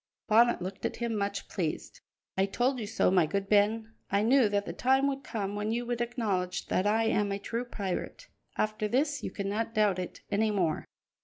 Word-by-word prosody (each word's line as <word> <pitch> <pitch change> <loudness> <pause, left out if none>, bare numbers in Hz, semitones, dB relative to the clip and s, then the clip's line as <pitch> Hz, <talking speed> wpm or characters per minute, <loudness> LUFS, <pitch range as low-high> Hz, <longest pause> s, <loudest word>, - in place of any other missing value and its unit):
Bonnet 230 -3 +4
looked 185 +1 -6
at - - -1
him 235 -1 -2
much 200 -1 -2
pleased. 165 -5 -4 0.3
"I 190 +1 +2
told 250 +6 0
you 215 - -4
so, 225 -3 +2
my 180 -4 +4
good 200 +4 -2
Ben. 220 +2 +2 0.2
I 200 +1 +3
knew 245 -1 +5
that 205 0 0
the - - -5
time 265 +2 +3
would 275 0 -2
come 205 -3 -3
when 210 +1 -2
you 240 +1 -1
would 240 0 -2
acknowledge 210 -7 -1
that 185 - +1
I 220 +2 +3
am 210 -2 +1
a 200 - -1
true 230 +4 -3
pirate; 215 - -4 0.3
after 215 0 0
this, 285 +5 +1
you - - -3
cannot 215 +3 -3
doubt 205 -4 +3
it 180 - -6
any 215 +2 +2
more." 180 -7 0
215 Hz, 205 wpm, -30 LUFS, 200-235 Hz, 0.3 s, knew